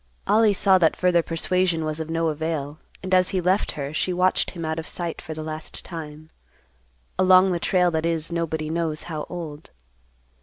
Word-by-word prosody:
Ollie 215 Hz, -1 st, +4 dB
saw 190 Hz, 0 st, +4 dB
that 165 Hz, -3 st, +3 dB
further 180 Hz, -1 st, +3 dB
persuasion 165 Hz, 0 st, 0 dB
was 155 Hz, 0 st, -3 dB
of 160 Hz, 0 st, -5 dB
no 165 Hz, 0 st, 0 dB
avail, 155 Hz, -1 st, -3 dB, 0.2 s
and 185 Hz, 0 st, -3 dB
as 185 Hz, 0 st, +4 dB
he 190 Hz, -, 0 dB
left 185 Hz, +3 st, +1 dB
her, 140 Hz, 0 st, -5 dB
she 180 Hz, -, 0 dB
watched 180 Hz, +1 st, +2 dB
him 170 Hz, -2 st, -6 dB
out 160 Hz, +1 st, -2 dB
of 160 Hz, -, -6 dB
sight 170 Hz, -2 st, -5 dB
for 160 Hz, -2 st, -7 dB
the 155 Hz, -, -5 dB
last 155 Hz, 0 st, -7 dB
time—along 150 Hz, -, -1 dB
the 175 Hz, -, 0 dB
trail 180 Hz, 0 st, +2 dB
that 160 Hz, -1 st, -1 dB
is 165 Hz, 0 st, -1 dB
nobody 160 Hz, -2 st, -2 dB
knows 160 Hz, -2 st, -2 dB
how 155 Hz, -3 st, -5 dB
old. 160 Hz, -4 st, -7 dB
165 Hz, 185 wpm, -24 LUFS, 155-180 Hz, 0.2 s, Ollie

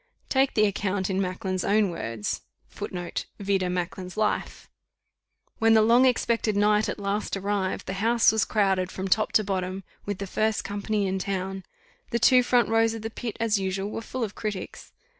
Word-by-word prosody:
Take 270 Hz, 0 st, +2 dB
the 215 Hz, -, +5 dB
account 195 Hz, -1 st, -1 dB
in 190 Hz, +1 st, 0 dB
Macklin's 185 Hz, 0 st, -2 dB
own 205 Hz, -2 st, +2 dB
words. 115 Hz, -10 st, -4 dB, 0.3 s
[Footnote: 175 Hz, -1 st, -5 dB
Vide 195 Hz, -2 st, 0 dB
Macklin's 180 Hz, +1 st, -4 dB
Life.] 215 Hz, -1 st, -1 dB, 0.9 s
"When 225 Hz, 0 st, +5 dB
the 220 Hz, -, +6 dB
long 240 Hz, +4 st, +5 dB
expected 230 Hz, -3 st, +1 dB
night 210 Hz, +1 st, +3 dB
at -, -, -3 dB
last 200 Hz, 0 st, -2 dB
arrived, 195 Hz, -1 st, -2 dB
the 190 Hz, -, -4 dB
house 230 Hz, +1 st, +4 dB
was 220 Hz, 0 st, +2 dB
crowded 190 Hz, -4 st, +1 dB
from 190 Hz, +1 st, -4 dB
top 215 Hz, +3 st, +2 dB
to 215 Hz, -, +4 dB
bottom, 190 Hz, -1 st, -3 dB, 0.2 s
with 205 Hz, -2 st, -2 dB
the 200 Hz, -, -4 dB
first 215 Hz, +3 st, 0 dB
company 205 Hz, +1 st, -1 dB
in 190 Hz, 0 st, -1 dB
town. 190 Hz, 0 st, -3 dB, 0.4 s
The 235 Hz, -, 0 dB
two 250 Hz, +2 st, +6 dB
front 245 Hz, -1 st, +3 dB
rows 225 Hz, 0 st, +3 dB
of 220 Hz, -, -7 dB
the 225 Hz, -, -4 dB
pit, 230 Hz, -1 st, -5 dB
as 225 Hz, -2 st, +2 dB
usual, 195 Hz, +1 st, -2 dB
were 225 Hz, -, -4 dB
full 250 Hz, +2 st, -4 dB
of 210 Hz, -2 st, -3 dB
critics. 210 Hz, -4 st, -6 dB
205 Hz, 180 wpm, -26 LUFS, 190-220 Hz, 0.9 s, the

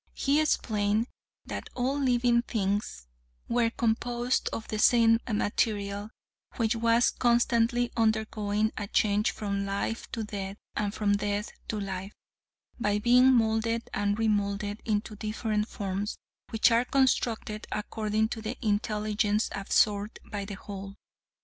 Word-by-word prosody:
He 285 Hz, +2 st, +2 dB
explained 215 Hz, -7 st, +1 dB, 0.4 s
that -, -, -6 dB
all 260 Hz, +3 st, 0 dB
living 245 Hz, -3 st, +3 dB
things 205 Hz, -, -2 dB, 0.4 s
were 235 Hz, -1 st, +2 dB
composed 240 Hz, +2 st, 0 dB
of 225 Hz, -, -5 dB
the 215 Hz, -, -3 dB
same 225 Hz, 0 st, +5 dB
material, 205 Hz, -1 st, -1 dB, 0.5 s
which 230 Hz, 0 st, +1 dB
was 230 Hz, +1 st, +3 dB
constantly 240 Hz, 0 st, +2 dB
undergoing 220 Hz, -1 st, +1 dB
a 205 Hz, -, -4 dB
change 205 Hz, +1 st, +2 dB
from 200 Hz, -2 st, -3 dB
life 200 Hz, +3 st, -3 dB
to 225 Hz, -, -2 dB
death 200 Hz, -2 st, -5 dB, 0.2 s
and 205 Hz, -1 st, 0 dB
from 205 Hz, -1 st, +1 dB
death 205 Hz, +1 st, -2 dB, 0.2 s
to 215 Hz, -, -2 dB
life 195 Hz, 0 st, -5 dB, 0.7 s
by 210 Hz, -2 st, +1 dB
being 250 Hz, +4 st, +5 dB
molded 230 Hz, -1 st, +1 dB
and 205 Hz, 0 st, 0 dB
remolded 205 Hz, -1 st, 0 dB
into 215 Hz, 0 st, -1 dB
different 215 Hz, 0 st, -2 dB
forms, 200 Hz, 0 st, -3 dB, 0.3 s
which 225 Hz, +2 st, +3 dB
are 230 Hz, +2 st, +3 dB
constructed 235 Hz, -5 st, 0 dB
according 215 Hz, 0 st, -1 dB
to 225 Hz, -, -5 dB
the 220 Hz, +3 st, -4 dB
intelligence 210 Hz, 0 st, 0 dB
absorbed 205 Hz, +1 st, +1 dB
by 205 Hz, -2 st, -3 dB
the 200 Hz, 0 st, -6 dB
whole. 195 Hz, 0 st, -8 dB
215 Hz, 130 wpm, -28 LUFS, 205-230 Hz, 0.7 s, same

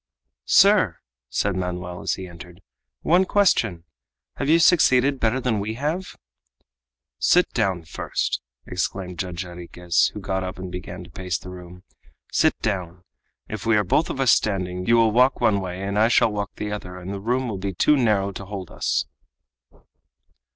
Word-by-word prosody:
"Sir," 185 Hz, -, +5 dB, 0.3 s
said 95 Hz, +7 st, 0 dB
Manoel 90 Hz, -1 st, -4 dB
as -, -, -1 dB
he 95 Hz, -, -7 dB
entered, 90 Hz, +2 st, -13 dB, 0.4 s
"one 180 Hz, +3 st, +4 dB
question! 120 Hz, -, +2 dB, 0.5 s
Have 140 Hz, -, -2 dB
you 165 Hz, -, +6 dB
succeeded 140 Hz, -5 st, +4 dB
better 115 Hz, +3 st, +1 dB
than 120 Hz, -5 st, 0 dB
we 110 Hz, +2 st, -3 dB
have?" 155 Hz, +8 st, -3 dB, 1.0 s
"Sit 180 Hz, +1 st, +4 dB
down 95 Hz, -7 st, 0 dB
first," 80 Hz, -, -3 dB, 0.2 s
exclaimed 90 Hz, 0 st, -4 dB
Judge 90 Hz, -1 st, -3 dB
Jarriquez, 90 Hz, -1 st, -1 dB
who -, -, -4 dB
got 95 Hz, -1 st, -2 dB
up 90 Hz, 0 st, -5 dB
and 95 Hz, -1 st, -7 dB
began 90 Hz, 0 st, -7 dB
to 85 Hz, -, -15 dB
pace 95 Hz, 0 st, -3 dB
the 90 Hz, -, -10 dB
room. 90 Hz, 0 st, -11 dB, 0.5 s
"Sit -, -, +2 dB
down. 90 Hz, -4 st, -3 dB, 0.4 s
If 110 Hz, 0 st, -6 dB
we 115 Hz, -2 st, +4 dB
are 105 Hz, -, +3 dB
both 150 Hz, -, +1 dB
of -, -, -4 dB
us 130 Hz, -3 st, +4 dB
standing, 90 Hz, -3 st, 0 dB
you 115 Hz, -, +5 dB
will 115 Hz, -1 st, +4 dB
walk 125 Hz, +4 st, +3 dB
one 100 Hz, -2 st, +3 dB
way 90 Hz, -1 st, -5 dB
and 100 Hz, +1 st, -1 dB
I 110 Hz, -, +5 dB
shall 115 Hz, -1 st, +3 dB
walk 100 Hz, -1 st, -4 dB
the 105 Hz, 0 st, -4 dB
other, 90 Hz, -3 st, -6 dB
and 90 Hz, +2 st, -6 dB
the 100 Hz, -, -6 dB
room 125 Hz, +4 st, 0 dB
will 105 Hz, -5 st, -4 dB
be 95 Hz, -1 st, -4 dB
too 150 Hz, -, +4 dB
narrow 105 Hz, -7 st, +2 dB
to 100 Hz, +1 st, -8 dB
hold 95 Hz, -3 st, -7 dB
us." -, -, -1 dB
100 Hz, 175 wpm, -23 LUFS, 90-115 Hz, 1.0 s, you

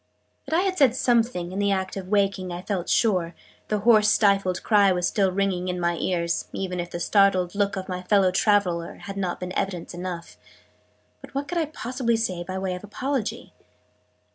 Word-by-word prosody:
That 315 Hz, -, 0 dB
I -, -, +3 dB
had 375 Hz, -3 st, -1 dB
said 260 Hz, -4 st, +5 dB
something, 230 Hz, -9 st, +1 dB
in 190 Hz, -, -4 dB
the 200 Hz, 0 st, +2 dB
act 190 Hz, -1 st, -1 dB
of 190 Hz, -2 st, -6 dB
waking, 195 Hz, -2 st, 0 dB
I 175 Hz, +1 st, -6 dB
felt 190 Hz, -3 st, -3 dB
sure: 180 Hz, -7 st, +1 dB, 0.3 s
the 210 Hz, -1 st, -1 dB
hoarse 215 Hz, -1 st, +5 dB
stifled 195 Hz, -4 st, +2 dB
cry 205 Hz, -3 st, +4 dB
was 180 Hz, -1 st, 0 dB
still 195 Hz, -3 st, +1 dB
ringing 185 Hz, -1 st, -1 dB
in 180 Hz, 0 st, -2 dB
my 170 Hz, 0 st, 0 dB
ears, 170 Hz, -2 st, -1 dB
even 180 Hz, -2 st, -3 dB
if 175 Hz, 0 st, -4 dB
the 175 Hz, -, -5 dB
startled 185 Hz, -1 st, +3 dB
look 200 Hz, -1 st, 0 dB
of 190 Hz, -1 st, -5 dB
my 180 Hz, -1 st, -4 dB
fellow 190 Hz, 0 st, +3 dB
traveler 185 Hz, -4 st, +1 dB
had 195 Hz, -, -8 dB
not 185 Hz, -3 st, -2 dB
been 180 Hz, 0 st, -5 dB
evidence 180 Hz, -3 st, -3 dB
enough: 175 Hz, -1 st, -6 dB, 0.8 s
but -, -, -14 dB
what 280 Hz, +1 st, -2 dB
could 350 Hz, -1 st, -1 dB
I 325 Hz, -, +1 dB
possibly 250 Hz, -4 st, -1 dB
say 185 Hz, -6 st, -2 dB
by 185 Hz, +2 st, -5 dB
way 190 Hz, -1 st, -2 dB
of 180 Hz, -, -7 dB
apology? 255 Hz, +3 st, -3 dB
195 Hz, 195 wpm, -25 LUFS, 180-210 Hz, 0.8 s, said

